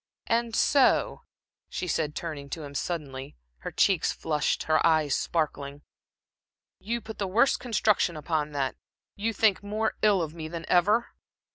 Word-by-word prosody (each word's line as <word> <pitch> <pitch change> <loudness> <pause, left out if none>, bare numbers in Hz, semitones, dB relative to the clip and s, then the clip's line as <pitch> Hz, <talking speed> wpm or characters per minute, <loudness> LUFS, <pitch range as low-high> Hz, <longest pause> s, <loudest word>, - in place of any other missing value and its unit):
"And 230 -1 0
so," 275 -3 +3 0.4
she - - -4
said, 155 -3 -1
turning 150 -4 -5
to 160 +2 -5
him 140 -1 -8
suddenly, 140 -2 -4 0.2
her - - -5
cheeks 190 -6 +2
flushed, 150 -2 -1
her 155 0 +2
eyes 155 -4 +3
sparkling 145 -3 -2 1.0
"you 220 +4 -4
you 235 - -1
put 220 0 -9
the 200 - -1
worst 235 +8 +3
construction 210 -7 +1
upon 150 -1 -1
that, 135 -2 -1 0.4
you 220 +3 -1
think 215 -3 +2
more 215 +2 -1
ill 200 -4 +4
of 155 -1 -5
me 160 -2 -6
than 165 +1 -6
ever?" 210 +7 +3
170 Hz, 155 wpm, -27 LUFS, 150-215 Hz, 1.0 s, ill